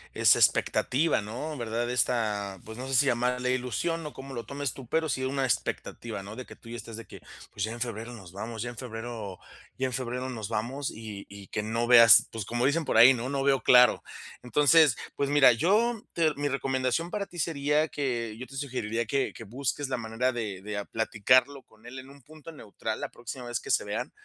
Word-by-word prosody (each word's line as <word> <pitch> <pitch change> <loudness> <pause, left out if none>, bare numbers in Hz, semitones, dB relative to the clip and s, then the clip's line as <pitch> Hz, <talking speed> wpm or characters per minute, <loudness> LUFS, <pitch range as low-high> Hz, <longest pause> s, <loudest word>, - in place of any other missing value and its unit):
esa - - +5
expectativa, 150 -1 +2
¿no?, 125 +9 -5
¿Verdad? 120 0 -2
Esta 105 -6 -1
pues, 110 0 -9
no 130 - -5
sé 135 - -1
si 140 - +5
llamarle 125 0 +1
ilusión 130 +7 -2
o 150 - -9
cómo 135 0 -9
lo 120 -3 -5
tomes 140 +2 -4
tú, 130 -4 -11
pero 160 +3 0
sí 130 -3 -2
una 135 +1 -1
expectativa, 115 -3 -3
¿no?, 100 +2 -9
de 130 +1 -7
que - - -11
tú 115 - -15
ya 120 - -6
estás 115 0 -9
de 115 - -9
que: - - -12 0.3
"Pues 100 - -4
ya 110 - -2
en 120 - -7
Febrero 115 0 -4
nos 95 -7 -11
vamos, 110 +4 -6
ya 120 - -4
en 120 - -14
Febrero 115 -5 -6 0.4
ya 130 - 0
en 130 - -3
Febrero 125 +1 -3
nos 110 -5 -5
vamos", 130 +6 -2
y 105 -3 -8
y 100 -1 -11
que 105 - -3
no 115 +2 -1
veas, 115 -3 +8
pues, 110 -3 -5
como 120 +3 -1
dicen 160 +4 +2
por - - +1
ahí, 120 +4 +9
¿no?, 125 +1 -4
"No 140 -1 -1
veo 135 -1 +3
claro". 125 -2 +6 0.4
Entonces, 150 +2 +4 0.2
pues 140 - -1
mira, 145 -3 +7
yo, 210 - +2
te 160 -3 +2
mi 145 0 -1
recomendación 135 +4 -1
para 200 -1 -3
ti 175 - -13
sería 150 -1 +1
que 120 -6 -2
yo 130 - -7
te 135 - -12
sugeriría 115 -4 -2
que 135 +5 0
que - - -10
busques 135 +5 -3
la 130 - -1
manera 115 +2 -1
de 105 -6 -4
de 105 0 -4
a 100 - -4
platicarlo 125 +5 +2
con 110 +1 -24
él 125 +2 -8
en 130 +1 -12
un 140 -1 -16
punto 155 +3 -12
neutral, 110 -6 -6
la - - -4
próxima 120 +2 -8
vez 120 0 -2
que - - -11
se - - +3
vean, - - -4
125 Hz, 225 wpm, -28 LUFS, 115-140 Hz, 0.4 s, ahí